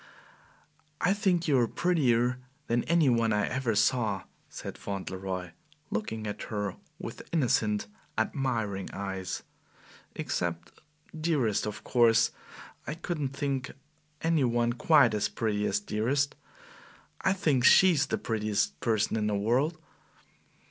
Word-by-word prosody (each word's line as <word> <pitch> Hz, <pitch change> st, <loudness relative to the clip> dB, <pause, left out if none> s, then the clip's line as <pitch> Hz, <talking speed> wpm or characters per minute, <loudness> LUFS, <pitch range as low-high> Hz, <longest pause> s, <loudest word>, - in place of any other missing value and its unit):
"I 185 Hz, -, +3 dB
think 190 Hz, -5 st, +1 dB
you 140 Hz, -4 st, +4 dB
are 120 Hz, -, +3 dB
prettier 125 Hz, -7 st, +2 dB, 0.3 s
than 120 Hz, +1 st, +1 dB
any 170 Hz, -2 st, +3 dB
one 115 Hz, -3 st, +3 dB
I 105 Hz, -1 st, +2 dB
ever 125 Hz, -4 st, -1 dB
saw," 110 Hz, -3 st, +2 dB, 0.3 s
said -, -, -7 dB
Fauntleroy, 95 Hz, -2 st, -5 dB, 0.4 s
looking 110 Hz, +1 st, -3 dB
at 105 Hz, -, -4 dB
her 105 Hz, -3 st, -3 dB, 0.2 s
with -, -, -7 dB
innocent, 110 Hz, -9 st, +1 dB, 0.3 s
admiring 110 Hz, -5 st, -1 dB
eyes, 95 Hz, -2 st, -4 dB, 0.7 s
"except 85 Hz, -1 st, -3 dB, 0.4 s
Dearest. 150 Hz, -11 st, +1 dB
Of 105 Hz, -, -6 dB
course, 115 Hz, -2 st, +4 dB, 0.6 s
I 150 Hz, -, -3 dB
couldn't 155 Hz, -5 st, -3 dB
think 135 Hz, -1 st, -2 dB, 0.5 s
any 165 Hz, -3 st, +3 dB
one 120 Hz, -1 st, +1 dB
QUITE 135 Hz, -2 st, +5 dB
as 105 Hz, -1 st, 0 dB
pretty 105 Hz, -2 st, -1 dB
as -, -, +1 dB
Dearest. 140 Hz, -, 0 dB, 0.9 s
I 190 Hz, -, +3 dB
think 150 Hz, -10 st, +1 dB
she 190 Hz, +8 st, +7 dB
is 145 Hz, -4 st, +1 dB
the -, -, -1 dB
prettiest 105 Hz, -, -1 dB
person 110 Hz, +2 st, +1 dB
in 105 Hz, -1 st, 0 dB
the 105 Hz, -, 0 dB
world." 125 Hz, +11 st, +1 dB
120 Hz, 125 wpm, -29 LUFS, 105-145 Hz, 0.9 s, she